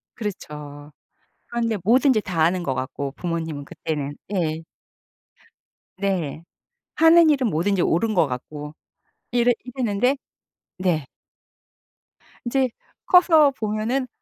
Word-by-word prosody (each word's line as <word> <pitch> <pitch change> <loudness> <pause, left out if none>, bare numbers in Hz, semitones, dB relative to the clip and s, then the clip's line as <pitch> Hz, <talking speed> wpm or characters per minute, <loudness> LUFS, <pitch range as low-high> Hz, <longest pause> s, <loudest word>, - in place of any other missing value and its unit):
그렇죠. 150 - -7 0.6
그런데 230 -2 0
뭐든지 250 +1 +4
다 175 -5 -1
아는 175 +2 +2
것 135 -5 -1
같고 135 +1 -4
부모님은 160 -4 -4
그때는. 145 -1 -4 0.2
예. 160 -3 -1 1.4
네. 170 -6 -2 0.5
하는 325 0 +7
일은 260 -5 +2
뭐든지 175 +3 +1
옳은 215 +6 +1
것 170 -5 +4
같고 150 +4 -7 0.6
이랬 245 0 +3
이랬는데 250 0 0 0.6
네. 170 -6 0 1.4
이제 260 +1 +1 0.4
커서 320 -5 +6
보면은 225 +3 -2
195 Hz, 210 characters per minute, -23 LUFS, 155-245 Hz, 1.4 s, 하는